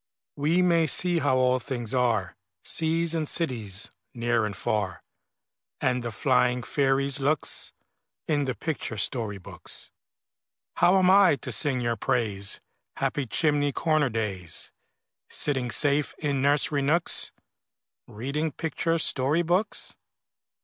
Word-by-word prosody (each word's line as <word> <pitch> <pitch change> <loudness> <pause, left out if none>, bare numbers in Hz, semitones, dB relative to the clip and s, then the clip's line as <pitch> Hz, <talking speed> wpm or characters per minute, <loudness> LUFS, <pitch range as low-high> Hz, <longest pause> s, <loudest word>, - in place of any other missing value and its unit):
We 160 +5 +2
may 170 -2 +3
see 175 +3 +3
how 140 -3 +2
all 130 0 +3
things 120 -3 -5
are, 115 -7 +1 0.3
Seas 165 0 0
and 160 -2 -1
cities, 110 - -1 0.2
near 120 -1 +1
and 100 - -6
far, 95 -6 -2 0.8
And 125 0 0
the 120 -1 -4
flying 125 +4 +1
fairies' 135 +1 +1
looks, 145 +2 0 0.6
In 145 -3 +1
the 130 -2 -2
picture 150 -7 -4
story 105 0 -2
books. 90 - -7 0.9
How 180 +2 +5
am 185 -1 +5
I 195 -5 +6
to 130 0 -6
sing 130 +3 +1
your 120 -1 -1
praise, 100 -5 0 0.4
Happy 140 -3 -2
chimney 145 +5 +1
corner 155 -2 +1
days, 100 -7 -3 0.6
Sitting 130 -4 0
safe 145 +3 +2
in 140 -3 -1
nursery 145 +1 +3
nooks, 160 +5 +2 0.8
Reading 140 +8 -3
picture 165 +2 -1
story 150 +1 +1
books? 180 +5 0
135 Hz, 125 wpm, -26 LUFS, 120-155 Hz, 0.9 s, I